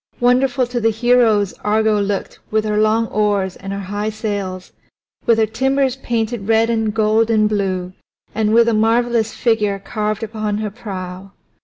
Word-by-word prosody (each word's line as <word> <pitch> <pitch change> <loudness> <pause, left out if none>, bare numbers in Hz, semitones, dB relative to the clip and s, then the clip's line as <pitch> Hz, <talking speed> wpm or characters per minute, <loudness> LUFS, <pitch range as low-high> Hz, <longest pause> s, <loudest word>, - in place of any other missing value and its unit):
Wonderful 250 +1 +2
to 245 0 -3
the 225 - +3
heroes 225 -3 +2
Argo 215 0 +2
looked 200 0 -3
with 215 0 0
her 210 0 0
long 215 +1 +2
oars 205 -3 0
and 195 0 -8
her 200 - -3
high 205 +3 -3
sails, 200 -4 -4 0.6
with 230 - +4
her 220 - +3
timbers 265 +4 0
painted 230 -4 -2
red 225 +1 +3
and 220 -2 0
gold 220 +1 +2
and 215 -2 +3
blue, 190 -3 -2 0.4
and 215 -1 0
with 230 +1 +5
a 230 - +2
marvelous 225 +1 +1
figure 210 -4 +1
carved 210 +2 -3
upon 215 -1 -3
her 215 -1 -3
prow. 190 -3 -8
215 Hz, 165 wpm, -18 LUFS, 205-230 Hz, 0.6 s, with